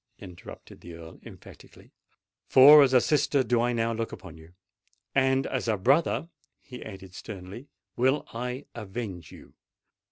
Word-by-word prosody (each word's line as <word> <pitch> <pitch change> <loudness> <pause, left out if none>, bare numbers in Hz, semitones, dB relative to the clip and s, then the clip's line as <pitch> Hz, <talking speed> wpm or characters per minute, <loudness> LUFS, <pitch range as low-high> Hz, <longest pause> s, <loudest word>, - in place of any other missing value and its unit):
interrupted 90 -3 -13
the 85 -1 -11
Earl 80 0 -13
emphatically; - - -15 0.6
"for 145 +3 +8
as 135 -2 +4
a 130 - +5
sister 140 0 +1
do 120 -2 0
I 120 +1 0
now 115 -1 -1
look 115 0 -4
upon 95 -4 -11
you—and 130 +10 -4
as 130 -2 -3
a 110 -2 0
brother," 140 - +1 0.3
he 125 -1 -11
added 95 -3 -11
sternly, 100 +6 -10 0.3
"will 130 +4 +1
I 125 +4 -5
avenge 100 -6 -7
you. - - -15
115 Hz, 140 wpm, -26 LUFS, 95-130 Hz, 0.6 s, for